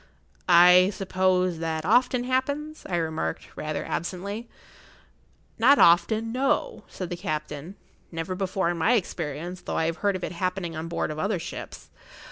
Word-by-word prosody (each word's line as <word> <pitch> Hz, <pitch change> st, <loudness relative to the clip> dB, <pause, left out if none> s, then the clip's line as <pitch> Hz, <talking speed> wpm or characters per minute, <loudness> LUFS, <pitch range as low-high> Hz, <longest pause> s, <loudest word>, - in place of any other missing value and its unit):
"I 180 Hz, +1 st, +7 dB
suppose 185 Hz, -2 st, +1 dB
that 160 Hz, -1 st, -3 dB
often 245 Hz, +4 st, +3 dB
happens?" 285 Hz, +5 st, -2 dB
I 180 Hz, -, 0 dB
remarked, 160 Hz, -1 st, -3 dB
rather 155 Hz, -1 st, -4 dB
absently. 200 Hz, +7 st, -4 dB, 1.1 s
"Not 270 Hz, +5 st, +6 dB
often—no," 225 Hz, -, +2 dB
said 185 Hz, -2 st, -7 dB
the -, -, -1 dB
captain; 155 Hz, 0 st, -5 dB, 0.4 s
"never 165 Hz, +2 st, -4 dB
before 185 Hz, -2 st, -1 dB
in 175 Hz, -, -4 dB
my 220 Hz, +9 st, +3 dB
experience, 175 Hz, -, -3 dB
though -, -, -4 dB
I 160 Hz, -, +1 dB
have 165 Hz, +1 st, -2 dB
heard 200 Hz, -1 st, 0 dB
of 185 Hz, -, -5 dB
it[Pg -, -, -2 dB
62] 170 Hz, -, -10 dB
happening 180 Hz, -2 st, -2 dB
on 160 Hz, +1 st, -5 dB
board 170 Hz, -, -2 dB
of 155 Hz, -, -6 dB
other 200 Hz, +4 st, 0 dB
ships. 165 Hz, -, -8 dB
180 Hz, 155 wpm, -26 LUFS, 165-210 Hz, 1.1 s, I